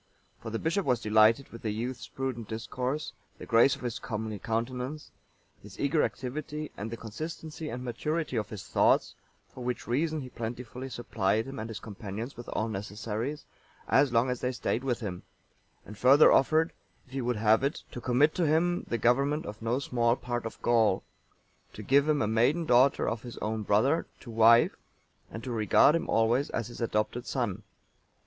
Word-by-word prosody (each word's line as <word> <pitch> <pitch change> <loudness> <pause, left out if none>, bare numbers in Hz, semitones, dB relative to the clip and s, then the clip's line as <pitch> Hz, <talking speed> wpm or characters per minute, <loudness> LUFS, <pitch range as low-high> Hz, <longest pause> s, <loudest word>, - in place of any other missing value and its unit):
For 115 - -6
the 115 - -2
bishop 165 - 0
was 125 -6 +1
delighted 110 +4 +4
with 115 - -11
the 110 - -2
youth's 120 +4 -4
prudent 130 -4 -4
discourse, 125 +6 -3 0.2
the - - -9
grace 120 +3 +5
of - - -13
his 120 -2 -3
comely 110 -2 -4
countenance, 125 +7 -3 0.5
his 105 -1 -13
eager 145 +2 +2
activity, 145 +7 -4
and 105 +4 -5
the 115 - -6
consistency 155 +7 -6
and 125 +2 -5
maturity 150 +4 -2
of 105 -2 -1
his 105 -4 -7
thoughts; - - +2 0.4
for 125 - -8
which 125 0 -3
reason 155 +5 0
he 130 - -8
plentifully 125 +3 -6
supplied 110 -3 -1
him 135 0 -7
and 110 +1 -5
his 110 - -6
companions 110 +3 -7
with 120 - -9
all 110 - -1
necessaries, 110 +6 -4 0.4
as 135 -1 +4
long 120 +2 +2
as 125 - -4
they 125 - 0
stayed 125 0 -2
with 125 -3 -1
him; 95 -5 -4 0.6
and 105 0 -11
further 135 +4 +7
offered, 155 +5 +3 0.3
if 130 - -24
he 135 - -2
would 120 0 0
have 110 +2 +3
it, 140 +3 -1
to 125 - -7
commit 130 +6 +3
to 170 -3 +1
him 175 +3 +1
the 120 - -1
government 140 +6 +2
of 105 +1 -8
no 115 +2 0
small 120 -3 +1
part 120 -2 -3
of - - -10
Gaul, 115 -3 +3 0.7
to 110 - -8
give 140 +7 +3
him 150 -2 +2
a - - 0
maiden 125 +10 +2
daughter 130 0 +4
of 115 - -2
his 120 -2 -9
own 110 0 -2
brother(898) 130 +12 +2 0.2
to 120 - -9
wife, 115 +1 +5 0.5
and 115 - -8
to 130 - -5
regard 115 +5 +5
him 165 +1 -1
always 115 +5 +2
as 115 0 -3
his 120 - -9
adopted 115 +2 -1
son. 110 -6 -2
120 Hz, 185 wpm, -29 LUFS, 110-135 Hz, 0.7 s, further